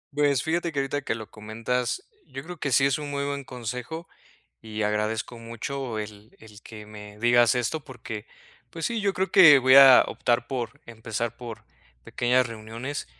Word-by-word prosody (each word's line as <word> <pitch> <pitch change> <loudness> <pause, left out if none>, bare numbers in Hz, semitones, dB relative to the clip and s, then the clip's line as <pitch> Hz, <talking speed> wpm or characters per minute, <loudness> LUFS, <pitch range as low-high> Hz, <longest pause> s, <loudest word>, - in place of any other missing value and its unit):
Pues, 145 -3 +2
fíjate 170 +1 -1
que 145 - -9
ahorita 135 +1 -2
que - - -2
lo 110 -2 -9
comentas, 115 - -3 0.2
yo 135 - -8
creo 180 +2 -9
que 140 -3 -3
sí 135 +3 +4
es 140 +2 +1
un 145 -1 -6
muy 140 0 -2
buen 140 0 -3
consejo 125 +7 -6 0.6
y 110 -1 -6
agradezco 105 +3 -2
mucho 115 +1 -5
el 105 0 -9
el 110 0 -15
que 105 -2 -11
me 105 -1 -12
digas 120 +1 +4
esto 125 +5 -2
porque, 110 -5 -8 0.4
pues, 165 -1 -4
sí, 230 -2 -2
yo 200 -1 +1
creo 190 0 -2
que 165 -8 +8
voy 130 0 +5
a 135 -2 +9
optar 120 0 -1
por 120 -3 -5
empezar 115 0 -5
por 120 -3 -9 0.4
pequeñas 125 +1 +1
reuniones 115 +5 -6
125 Hz, 175 wpm, -25 LUFS, 110-140 Hz, 0.6 s, a